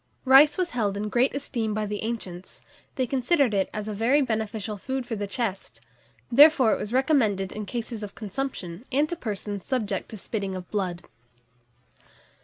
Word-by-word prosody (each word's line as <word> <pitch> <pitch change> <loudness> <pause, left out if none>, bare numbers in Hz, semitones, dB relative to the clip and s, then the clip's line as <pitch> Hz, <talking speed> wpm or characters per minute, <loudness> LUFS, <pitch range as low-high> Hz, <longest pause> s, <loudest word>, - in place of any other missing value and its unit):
RICE 280 +3 +7
was 365 -2 -1
held 210 -5 -1
in 210 +1 -3
great 250 +5 +2
esteem 230 -6 -2
by 215 0 -1
the 210 0 -4
ancients: 195 -6 -6 0.3
they 260 - +1
considered 265 0 +2
it 195 -1 +1
as 210 0 -5
a 215 - -3
very 230 +8 +3
beneficial 220 -2 -3
food 260 +5 -4
for 235 -2 -3
the 205 -1 -3
chest; 200 -3 -4 0.5
therefore 275 -3 +7
it - - -1
was 210 - -4
recommended 235 -8 +2
in 210 -1 -6
cases 235 0 -4
of 205 -1 -7
consumption, 205 -4 -5
and 285 +4 +2
to 345 - -2
persons 205 - -4
subject 215 -8 -2
to 220 - -7
spitting 195 -1 -3
of 180 -1 -7
blood. 185 -4 -2
220 Hz, 175 wpm, -26 LUFS, 200-260 Hz, 0.5 s, RICE